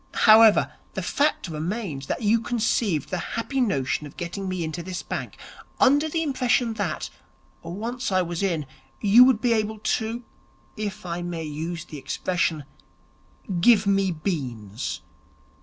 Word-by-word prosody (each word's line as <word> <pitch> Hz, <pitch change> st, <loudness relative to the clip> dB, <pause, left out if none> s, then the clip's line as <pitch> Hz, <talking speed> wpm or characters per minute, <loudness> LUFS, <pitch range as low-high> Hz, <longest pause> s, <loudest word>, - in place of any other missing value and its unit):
However, 220 Hz, -1 st, +7 dB, 0.2 s
the -, -, -2 dB
fact 290 Hz, -7 st, +1 dB
remains 160 Hz, -3 st, -4 dB
that -, -, -3 dB
you 220 Hz, +2 st, +4 dB
conceived 225 Hz, -, 0 dB
the 185 Hz, -, -1 dB, 0.2 s
happy 265 Hz, +4 st, -1 dB
notion 145 Hz, -, 0 dB
of 140 Hz, -, -15 dB
getting 190 Hz, +3 st, -4 dB
me 185 Hz, -2 st, -2 dB
into 160 Hz, +2 st, -4 dB
this 180 Hz, +1 st, -5 dB
bank, -, -, -5 dB, 0.4 s
under 290 Hz, +4 st, +4 dB
the 325 Hz, +1 st, 0 dB
impression 250 Hz, -5 st, +1 dB
that, 200 Hz, -8 st, -3 dB, 0.5 s
once 225 Hz, +8 st, -4 dB
I 185 Hz, -1 st, +3 dB
was 170 Hz, 0 st, -4 dB
in, 170 Hz, -7 st, 0 dB, 0.3 s
you 215 Hz, +4 st, +7 dB
would 255 Hz, -4 st, +3 dB
be 240 Hz, -2 st, +3 dB
able 220 Hz, 0 st, -1 dB
to 225 Hz, +2 st, -2 dB, 0.5 s
if 210 Hz, -3 st, -5 dB
I 175 Hz, 0 st, -3 dB
may 175 Hz, -2 st, -4 dB
use 160 Hz, +2 st, -5 dB
the 150 Hz, -, -8 dB
expression 160 Hz, +2 st, -1 dB, 1.0 s
give 215 Hz, +2 st, +5 dB
me 195 Hz, -1 st, +2 dB
beans. 130 Hz, -, -4 dB
195 Hz, 145 wpm, -25 LUFS, 165-230 Hz, 1.0 s, However